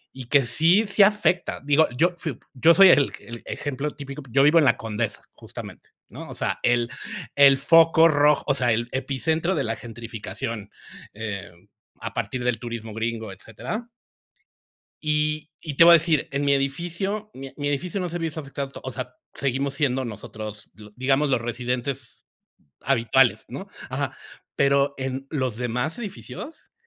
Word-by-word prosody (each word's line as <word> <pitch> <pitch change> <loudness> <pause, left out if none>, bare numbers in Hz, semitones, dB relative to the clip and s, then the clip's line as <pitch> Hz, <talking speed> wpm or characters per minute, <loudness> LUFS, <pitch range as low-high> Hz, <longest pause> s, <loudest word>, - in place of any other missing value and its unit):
Y 130 -1 -8
que 135 +2 +3
sí, 165 - +4
sí 205 0 +2
afecta. 205 -3 +3
Digo, 145 +2 +4
yo 175 +5 +3
fui 155 -8 -4 0.2
yo 160 +6 +5
soy 195 -1 +9
el 145 -5 +5
el 120 -1 -10
ejemplo 145 +1 -4
típico, 140 0 -8
yo 135 +3 +4
vivo 150 +3 +6
en 155 - +4
La 125 -3 +4
Condesa, 110 -2 -3
justamente, - - -10 0.2
¿no? - - -10
O - - -8
sea, - - -2
el 120 -1 +1 0.4
el 140 -1 +7
foco 165 +3 +6
rojo, 150 -1 +3
o 140 - +2
sea, 125 -3 +1
el 115 +2 0
epicentro 155 +7 -1
de 145 - 0
la 115 -1 -2
gentrificación, 115 -2 -6 0.4
eh, 100 -5 -6 0.5
a - - -6
partir 125 -1 -3
del 125 -2 0
turismo 115 -2 -6
gringo, 110 -2 -3
etcétera. 120 - -7 1.2
Y 150 0 0 0.2
y 150 -3 -4
te 165 - +7
voy 170 - +9
a - - +10
decir, 165 -2 +3
en 140 +1 -1
mi 140 - +4
edificio, 170 +10 -2
mi 135 0 -8
mi 145 -1 -2
edificio 175 +7 -2
no 180 - -2
se 170 - -6
ha - - -2
visto 160 -1 -3
afectado 140 -1 -5
to - - -10
o - - -2
sea, 125 0 -6 0.2
seguimos 140 0 -1
siendo 135 -3 0
nosotros, 105 -1 -8
di 105 0 -14
digamos, 135 +3 +1
los 125 -4 +1
residentes 125 +2 -4 0.6
habituales, 130 -1 +3
¿no? - - -7 0.2
Ajá. - - -3 0.4
Pero, 140 0 +3
en 135 0 -4
los 130 -7 -2
demás 125 +6 -2
edificios, 240 +8 -8
135 Hz, 170 wpm, -24 LUFS, 120-155 Hz, 1.2 s, a